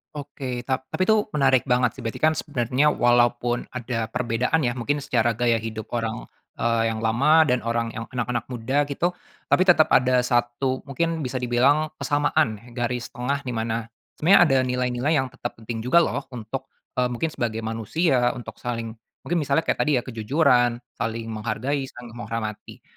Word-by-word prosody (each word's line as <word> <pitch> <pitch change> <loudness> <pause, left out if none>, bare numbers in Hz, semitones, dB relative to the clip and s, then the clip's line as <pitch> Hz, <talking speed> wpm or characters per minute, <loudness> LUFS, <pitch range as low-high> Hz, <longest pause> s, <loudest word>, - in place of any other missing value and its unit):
Oke 135 -3 -5
tap 130 0 -2
tapi 185 - 0
itu 220 -1 +4
menarik 135 -3 +3
banget 125 -1 +1
sih. - - -9
Berarti 115 - -4
kan 155 0 +3
sebenarnya 140 -1 +1
walaupun 120 -1 +2
ada 115 -2 -3
perbedaan 125 +5 0
ya 120 -4 0
mungkin 145 +4 -1
secara 120 -5 +1
gaya 115 +1 +1
hidup 110 -1 -5
orang, 115 -1 -3 0.3
eee, 115 -1 +1
yang 110 - -4
lama 140 +8 +4
dan 125 -2 +1
orang 115 0 -1
yang 115 - -4
anak-anak 120 -2 -2
muda 130 +5 0
gitu, 170 +5 -1 0.3
tapi 185 - +4
tetap 175 -4 +5
ada 125 0 +4
satu 125 +2 0
mungkin 160 +3 -2
bisa 130 0 -3
dibilang 130 +5 +3
kesamaan 145 -6 +1
ya 120 - -18
garis 125 0 -2
tengah 125 +3 -2
di 125 - -3
mana, 115 0 -2 0.3
sebenarnya 185 +6 +6
ada 135 -5 +3
nilai-nilai 125 +4 0
yang 130 -2 0
tetap 120 -2 -6
penting 115 0 -6
juga 130 +9 +4
loh 140 -3 -3
untuk, 115 +3 -6 0.3
eee, 125 - +3
mungkin 125 +6 -2
sebagai 115 -4 -3
manusia 120 - +1
untuk 110 -3 -9
saling, 115 -2 -4 0.3
mungkin 175 - -1
misalnya 145 +1 +1
kayak - - -1
tadi 150 -2 +2
ya 120 - 0
kejujuran, 125 +1 +2 0.2
saling 115 0 -3
menghargai, 120 +6 -2
saling 120 -2 -11
menghormati. 115 -2 -6
125 Hz, 170 wpm, -24 LUFS, 115-140 Hz, 0.3 s, sebenarnya